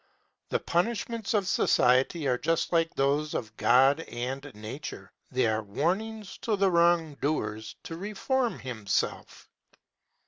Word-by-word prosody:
The - - +1
punishments 225 +4 -1
of 200 -3 +1
society 135 -1 +3
are 125 -1 +1
just 165 -1 0
like 165 -1 +2
those 145 +2 +1
of 110 -2 -4
God 135 +7 +5
and 130 -2 -4
Nature 110 +8 -7 0.2
they 130 -1 +1
are 110 -1 +1
warnings 185 - -2
to 220 - 0
the 195 -1 +2
wrong 170 -2 +3
doer 110 -8 -1 0.2
to 165 - -6
reform 225 +6 -1
himself. 110 -6 -3
155 Hz, 130 wpm, -28 LUFS, 125-190 Hz, 0.2 s, God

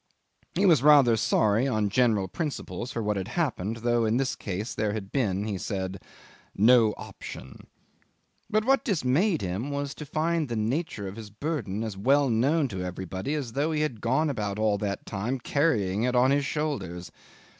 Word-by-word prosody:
He 195 +4 +2
was 165 -9 +5
rather 140 -5 +6
sorry, 110 +2 +2
on 110 -5 0
general 110 -5 +2
principles, 135 - -4
for 115 - -3
what 105 -1 0
had 95 0 -3
happened, 115 - -2
though 120 -1 +3
in 110 +1 +2
this 130 -1 0
case 100 +2 -4
there 105 -2 -1
had 100 -3 -5
been, 100 -8 0
he 105 -3 -3
said, 95 -1 -4 0.5
"no 110 0 +5
option." 65 +1 -10 0.8
But 215 0 +1
what 270 +2 +3
dismayed 165 - +1
him 95 +9 -3
was 140 -1 -3
to 150 - -8
find 155 0 0
the 120 - -2
nature 110 - -2
of 95 +3 -8
his 110 -2 -8
burden 110 -3 -3
as 110 -4 -5
well 135 +5 +3
known 140 +7 +2
to 95 -4 -5
everybody 95 - -4
as 130 -7 -4
though 145 +4 0
he 155 -1 0
had 130 -9 -2
gone 135 +6 +1
about 105 -5 -3
all 105 -2 +1
that 100 -2 -3
time 110 +7 -3
carrying 110 - +1
it 125 +1 +1
on 125 +2 +4
his 140 0 +2
shoulders. 100 - -3
115 Hz, 180 wpm, -27 LUFS, 100-145 Hz, 0.8 s, rather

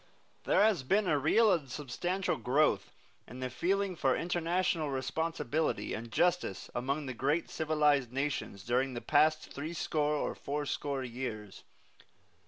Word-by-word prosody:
There - - +4
has 210 -8 +3
been 195 +10 +2
a 150 -4 +3
real 220 - +4
and 150 -7 -2
substantial 175 +8 -2
growth 130 -5 +1 0.4
in 125 +3 -9
the 130 -1 -3
feeling 190 +8 0
for 135 -5 +2
international 175 -2 0
responsibility 155 +2 -1
and 115 +1 -6
justice 175 - 0
among 140 +4 -2
the 130 - -4
great 145 +7 0
civilized 150 -5 +2
nations 135 -7 -3
during 125 +3 0
the 120 - -4
past 155 +1 +2
threescore 150 0 -1
or - - -1
fourscore 140 -1 -3
years. 115 -5 -6
145 Hz, 135 wpm, -32 LUFS, 130-165 Hz, 0.4 s, There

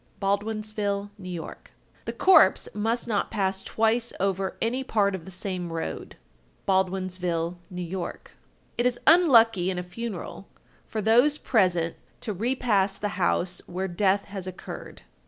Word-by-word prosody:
Baldwinsville, 205 0 -1
N.Y. 185 -2 -5
1254. 160 - -7 0.5
The - - -3
corpse 380 0 +5
must 225 +3 -1
not 210 -3 0
pass 195 -1 -1
twice 225 +3 +1
over 195 0 -1
any 250 +4 0
part 205 -6 +1
of 180 -4 -5
the - - -9
same 185 -2 -4
road. 165 0 -5 0.5
Baldwinsville, 185 -3 0
N.Y. 180 0 -5
1255. 175 - -7 0.4
It 240 - +4
is 240 -1 -1
unlucky 230 - +6
in 185 - -2
a 180 - -2
funeral, 195 0 -6 0.4
for 220 - -3
those 245 +7 +5
present 180 - +1 0.2
to 215 - -3
repass 205 -3 +1
the 205 - -2
house 180 -1 0
where 185 +2 -3
death 195 +2 +1
has 195 -2 -7
occurred. 185 - -8
195 Hz, 140 wpm, -26 LUFS, 185-225 Hz, 0.5 s, unlucky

